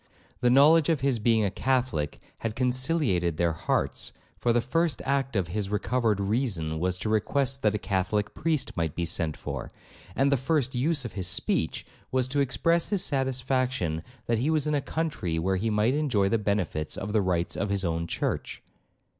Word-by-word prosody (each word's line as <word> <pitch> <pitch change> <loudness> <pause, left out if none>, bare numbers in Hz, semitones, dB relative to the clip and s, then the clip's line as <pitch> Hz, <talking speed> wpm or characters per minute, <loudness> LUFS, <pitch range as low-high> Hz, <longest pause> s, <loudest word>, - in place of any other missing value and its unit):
The 125 - +3
knowledge 150 +5 +6
of 160 -5 +1
his 135 -4 +1
being 110 -1 +3
a 100 - 0
Catholic 125 - -1 0.2
had 115 -1 -3
conciliated 125 - +1
their 85 -1 +2
hearts, 80 - -1 0.3
for 120 - +2
the 120 - +3
first 155 +4 0
act 135 -2 0
of 95 -4 0
his 100 +2 -2
recovered 110 0 0
reason 100 -7 -1
was 90 +1 0
to 95 - -4
request 135 +5 +1
that 105 -2 +2
a - - +2
Catholic 105 +1 -1
priest 155 -4 -1
might 80 -4 -1
be 85 - -1
sent 80 -2 -1
for, - - -6 0.4
and 140 +1 +3
the 140 - +4
first 135 0 0
use 140 +2 +1
of 115 - -6
his 95 -2 -1
speech 80 -3 0 0.3
was 130 -1 +1
to 145 +2 0
express 140 +6 +1
his 200 -3 +1
satisfaction 130 - 0 0.2
that 115 -2 +1
he 135 +6 +1
was 155 -3 +2
in 150 - 0
a 145 - +1
country 150 - -2
where 95 +3 +1
he 110 +4 -1
might 105 +3 +2
enjoy 130 -10 +1
the 115 +3 +1
benefits 95 -7 -1
of 105 +2 -4
the 110 - +3
rites 90 -2 0
of 100 - -2
his 100 -1 0
own 85 0 -1
church. - - -3
115 Hz, 190 wpm, -27 LUFS, 95-135 Hz, 0.4 s, knowledge